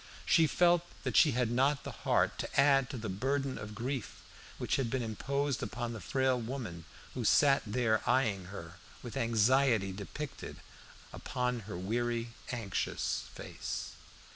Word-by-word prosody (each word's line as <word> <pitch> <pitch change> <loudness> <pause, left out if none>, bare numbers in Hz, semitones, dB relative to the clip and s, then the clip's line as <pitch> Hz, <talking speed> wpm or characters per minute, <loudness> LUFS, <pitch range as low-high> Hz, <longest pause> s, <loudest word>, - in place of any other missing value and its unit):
She 165 -2 +5
felt 175 +2 +4 0.2
that - - -2
she 150 -5 +6
had 120 -1 +1
not 135 +3 +2
the - - -5
heart - - +1
to - - -2
add 135 -2 +5
to 130 - -5
the 110 -1 -4
burden 135 +7 -1
of 105 0 -7
grief 125 0 -4 0.3
which - - 0
had 130 -4 0
been 130 0 -1
imposed 140 +5 -1
upon 120 0 -3
the 110 - -7
frail 130 -2 +1
woman 110 - -5 0.3
who 125 - -3
sat 135 +5 +5
there 110 0 +1
eyeing 110 -7 +2
her 85 -2 -9 0.3
with 120 -4 -7
anxiety 115 -2 +3
depicted 105 +9 -7 0.6
upon 125 -1 -2
her 85 - -4
weary, 115 +4 -1 0.2
anxious 115 -7 -2
face. - - -5
120 Hz, 150 wpm, -32 LUFS, 110-135 Hz, 0.6 s, she